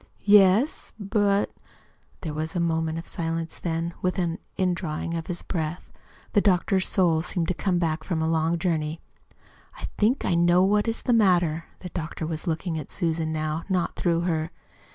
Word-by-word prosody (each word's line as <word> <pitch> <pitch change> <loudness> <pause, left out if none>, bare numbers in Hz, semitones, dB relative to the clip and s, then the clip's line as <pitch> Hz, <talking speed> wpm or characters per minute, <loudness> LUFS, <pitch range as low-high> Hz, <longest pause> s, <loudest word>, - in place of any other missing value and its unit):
"Yes; 205 +6 +5
but 200 0 +1 0.3
" - - -36
There 155 -4 -4
was 155 +2 -4
a - - +1
moment's 165 0 -1
silence; 165 -1 -3
then, 165 0 -2
with 185 +1 0
an 170 -2 -1 0.2
indrawing 175 -3 -1
of 165 -1 -3
his 175 - -4
breath, 165 -1 -4 0.4
the 205 - +5
doctor's 190 0 +2
soul 170 -4 +3
seemed 170 -1 -2
to - - +2
come 180 0 0
back 160 -2 0
from 170 -1 -2
a 160 - 0
long 165 +1 +1
journey. 160 -2 -1 0.8
"I - - -6
think 230 +6 +2
I - - +2
know 175 +1 +4
what 205 +3 +2
is 225 - -1
the 245 - +2
matter." 175 -7 +3 0.2
The 180 - -6
doctor 165 -1 -4
was 160 +3 -4
looking 165 0 -1
at 150 - -8
Susan, 165 -3 -1
now, 155 +1 -2
not 185 -2 0
through 170 -2 +1
her. 160 -2 -1
170 Hz, 175 wpm, -25 LUFS, 160-185 Hz, 0.8 s, Yes